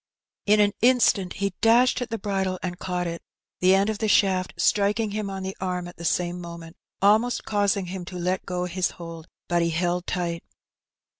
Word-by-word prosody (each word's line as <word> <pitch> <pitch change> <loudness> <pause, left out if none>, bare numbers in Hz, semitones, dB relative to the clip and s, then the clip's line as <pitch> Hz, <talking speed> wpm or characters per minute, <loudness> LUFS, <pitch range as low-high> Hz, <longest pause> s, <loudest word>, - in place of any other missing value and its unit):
In 210 +1 +5
an 205 -1 +4
instant 230 -6 +3
he 200 -1 -2
dashed 240 +3 +4
at 245 - -3
the 225 - -2
bridle 195 -3 -1
and 180 0 -4
caught 180 -1 -2
it, 170 0 -4 0.4
the 185 +1 +5
end 195 +1 +2
of 215 -2 -2
the 220 - 0
shaft 190 -3 +3
striking 210 +1 +2
him 210 -1 -3
on 190 -1 -5
the 190 0 -4
arm 180 -1 -2
at 175 - -12
the 170 - -7
same 175 +1 0
moment, 170 -1 -9 0.3
almost 220 +5 +3
causing 205 -2 +1
him 180 +1 -6
to 180 0 -7
let 180 +2 -1
go 180 -1 -3
his 180 0 -1
hold, 165 -2 -9 0.2
but 175 0 +1
he 170 - +1
held 175 +2 -1
tight. 170 -2 -2
185 Hz, 200 wpm, -25 LUFS, 175-205 Hz, 0.4 s, In